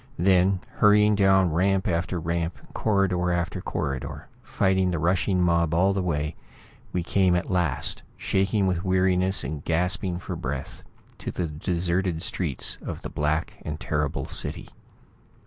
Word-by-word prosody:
Then, 95 Hz, +1 st, +3 dB, 0.2 s
hurrying 105 Hz, 0 st, +5 dB
down 95 Hz, -4 st, +4 dB
ramp 95 Hz, +3 st, +2 dB
after 85 Hz, +1 st, -1 dB
ramp, 85 Hz, 0 st, -2 dB, 0.2 s
corridor 95 Hz, -4 st, +1 dB
after 85 Hz, -1 st, -1 dB
corridor, 70 Hz, -2 st, -4 dB
fighting 95 Hz, -1 st, +1 dB
the 90 Hz, -, -1 dB
rushing 90 Hz, +3 st, +1 dB
mob 85 Hz, -2 st, +2 dB
all 95 Hz, +3 st, +3 dB
the 95 Hz, -, 0 dB
way, 75 Hz, -3 st, -2 dB, 0.6 s
we 90 Hz, -, -1 dB
came 95 Hz, 0 st, +2 dB
at 90 Hz, -, -2 dB
last, 85 Hz, -8 st, 0 dB, 0.2 s
shaking 95 Hz, +1 st, +1 dB
with 90 Hz, -2 st, 0 dB
weariness 95 Hz, 0 st, +2 dB
and 75 Hz, +2 st, -5 dB
gasping 90 Hz, +2 st, 0 dB
for 90 Hz, -, -5 dB
breath, 65 Hz, 0 st, -5 dB, 0.4 s
to -, -, -5 dB
the 90 Hz, -, -2 dB
deserted 85 Hz, +2 st, -1 dB
streets 80 Hz, -10 st, -1 dB
of -, -, -6 dB
this -, -, -6 dB
black 75 Hz, +2 st, -1 dB
and 75 Hz, 0 st, -5 dB
terrible 75 Hz, -1 st, -2 dB
city. -, -, -3 dB
90 Hz, 145 wpm, -25 LUFS, 85-95 Hz, 0.6 s, hurrying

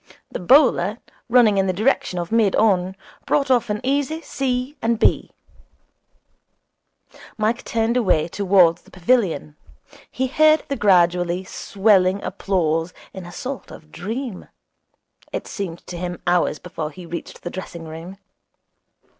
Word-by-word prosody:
The -, -, -4 dB
bowler, 215 Hz, -, +4 dB, 0.3 s
running 225 Hz, -5 st, +5 dB
in 195 Hz, -, +1 dB
the 185 Hz, -, +1 dB
direction 210 Hz, -2 st, 0 dB
of 175 Hz, +1 st, -4 dB
mid 225 Hz, -4 st, +3 dB
on, 190 Hz, -4 st, +2 dB, 0.3 s
brought 280 Hz, -2 st, +1 dB
off 245 Hz, -4 st, +2 dB
an 210 Hz, 0 st, -1 dB
easy 285 Hz, +4 st, 0 dB
c. 260 Hz, +1 st, -2 dB
and 230 Hz, 0 st, +1 dB
b. -, -, +2 dB, 2.1 s
Mike 220 Hz, +3 st, 0 dB
turned 230 Hz, +1 st, 0 dB
away 190 Hz, -11 st, +2 dB
towards 180 Hz, -2 st, +3 dB
the -, -, -21 dB
pavilion. 180 Hz, -, 0 dB, 0.5 s
He 260 Hz, -, -2 dB
heard 310 Hz, +3 st, +4 dB
the 280 Hz, -, -1 dB
gradually 180 Hz, -3 st, +2 dB
swelling 195 Hz, -1 st, +2 dB
applause 175 Hz, -4 st, -1 dB, 0.2 s
in 190 Hz, -2 st, -8 dB
a -, -, -10 dB
sort 260 Hz, +9 st, -6 dB
of 155 Hz, -1 st, -13 dB
dream. 220 Hz, +4 st, -5 dB, 0.8 s
It -, -, -4 dB
seemed 175 Hz, -5 st, -6 dB
to 175 Hz, -, -7 dB
him 175 Hz, -1 st, -4 dB
hours 175 Hz, -3 st, +2 dB
before 165 Hz, -3 st, -6 dB
he 180 Hz, +3 st, -11 dB
reached 170 Hz, +1 st, -8 dB
the 175 Hz, -, -5 dB
dressing 175 Hz, -3 st, -7 dB
room. 165 Hz, +4 st, -9 dB
195 Hz, 140 wpm, -21 LUFS, 175-235 Hz, 2.1 s, running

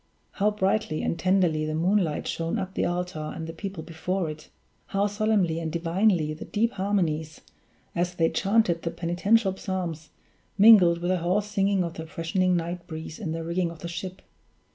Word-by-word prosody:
How 210 Hz, +1 st, +2 dB
brightly 195 Hz, -5 st, 0 dB
and 170 Hz, -, -1 dB
tenderly 180 Hz, -4 st, +2 dB
the 155 Hz, 0 st, -2 dB
moonlight 175 Hz, -1 st, +1 dB
shone 165 Hz, 0 st, -2 dB
upon 190 Hz, 0 st, -4 dB
the -, -, 0 dB
altar 175 Hz, -3 st, -3 dB
and 160 Hz, -, -5 dB
the 165 Hz, -, -6 dB
people 190 Hz, -1 st, -6 dB
before 170 Hz, +1 st, -2 dB
it! 155 Hz, 0 st, -11 dB, 0.4 s
how 200 Hz, +1 st, +1 dB
solemnly 205 Hz, -5 st, +1 dB
and 160 Hz, -1 st, -3 dB
divinely 170 Hz, -1 st, +1 dB
the 155 Hz, -, -8 dB
deep 230 Hz, +3 st, 0 dB
harmonies, 170 Hz, -7 st, -1 dB, 0.5 s
as 175 Hz, +1 st, -1 dB
they 165 Hz, -2 st, +2 dB
chanted 195 Hz, -4 st, +2 dB
the 170 Hz, -, -2 dB
penitential 190 Hz, +5 st, +1 dB
Psalms, 175 Hz, -5 st, -4 dB, 0.5 s
mingled 195 Hz, -5 st, +7 dB
with 175 Hz, +1 st, 0 dB
the 185 Hz, -, +1 dB
hoarse 185 Hz, +5 st, +1 dB
singing 200 Hz, -2 st, +1 dB
of 170 Hz, -1 st, -4 dB
the 160 Hz, 0 st, -7 dB
freshening 180 Hz, +3 st, 0 dB
night 170 Hz, +1 st, -4 dB
breeze 160 Hz, -1 st, -7 dB
in 170 Hz, -7 st, -3 dB
the 165 Hz, 0 st, -3 dB
rigging 170 Hz, +1 st, -1 dB
of 165 Hz, -, -9 dB
the 170 Hz, -, -4 dB
ship! 180 Hz, +2 st, -6 dB
175 Hz, 180 wpm, -26 LUFS, 165-195 Hz, 0.5 s, mingled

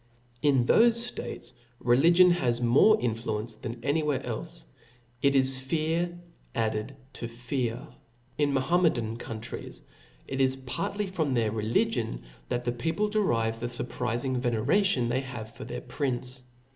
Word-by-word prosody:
In 135 Hz, -5 st, +3 dB
thofe 235 Hz, -, +4 dB
ftates, -, -, -7 dB, 0.3 s
religion 170 Hz, +9 st, +5 dB
has 125 Hz, -9 st, +1 dB
more 130 Hz, -, +5 dB
influence 115 Hz, -1 st, -2 dB
than 115 Hz, 0 st, -7 dB
any 145 Hz, +4 st, +2 dB
where 150 Hz, -4 st, 0 dB
elfe -, -, -4 dB
•, -, -, -8 dB, 0.6 s
it 140 Hz, 0 st, +3 dB
is 130 Hz, 0 st, +3 dB
fear 165 Hz, +5 st, -1 dB, 0.4 s
added 110 Hz, +2 st, -1 dB, 0.2 s
to 120 Hz, -, -5 dB
fear. 120 Hz, +2 st, -3 dB, 0.5 s
In 145 Hz, -1 st, +1 dB
Ma* 135 Hz, -1 st, +2 dB
hometan 130 Hz, -9 st, +1 dB
countries, 115 Hz, -1 st, -7 dB, 0.4 s
it 135 Hz, 0 st, -1 dB
is 130 Hz, 0 st, +3 dB
partly 165 Hz, +10 st, -3 dB
from 160 Hz, -8 st, -1 dB
thctr 110 Hz, -3 st, +1 dB
religion 105 Hz, -, 0 dB, 0.3 s
that 120 Hz, -, -1 dB
the 120 Hz, -, 0 dB
people 165 Hz, -, -1 dB
derive 115 Hz, -, +1 dB
the 120 Hz, -, -2 dB
furprizing 120 Hz, +1 st, -2 dB
veneration 125 Hz, -, +2 dB
they^ 125 Hz, +3 st, 0 dB
have 120 Hz, -4 st, -7 dB
for -, -, -8 dB
their -, -, -5 dB
prince. 125 Hz, -, -3 dB
130 Hz, 145 wpm, -28 LUFS, 120-155 Hz, 0.6 s, religion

